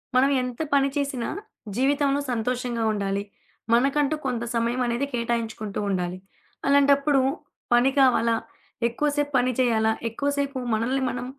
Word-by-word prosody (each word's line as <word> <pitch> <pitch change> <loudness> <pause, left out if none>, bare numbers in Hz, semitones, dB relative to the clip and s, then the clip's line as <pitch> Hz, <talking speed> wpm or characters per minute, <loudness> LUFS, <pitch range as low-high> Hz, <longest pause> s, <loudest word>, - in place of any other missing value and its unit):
మనం 265 +2 +5
ఎంత 250 +2 -4
పని 275 0 +4
చేసినా, 275 -4 -1 0.5
జీవితంలో 280 +2 +2
సంతోషంగా 240 0 -1
ఉండాలి. 200 -1 -1 0.5
మనకంటూ 275 +4 +3
కొంత 245 -3 -1
సమయం 235 +2 0
అనేది 240 +3 0
కేటాయించుకుంటూ 230 -3 -2
ఉండాలి. 180 -1 -1 0.5
అలాంటప్పుడు 280 0 +4 0.5
పని 245 +3 +5
కావాలా? 235 -3 +4 0.5
ఎక్కువ 240 +6 -1
సేపు 290 -1 0
పని 250 +1 +2
చేయాలా? 220 -3 +3 0.2
ఎక్కువ 280 +6 -2
సేపు 280 -1 -1 0.2
మనల్ని 240 +5 0
మనం 245 0 -4
250 Hz, 125 wpm, -25 LUFS, 230-275 Hz, 0.5 s, మనం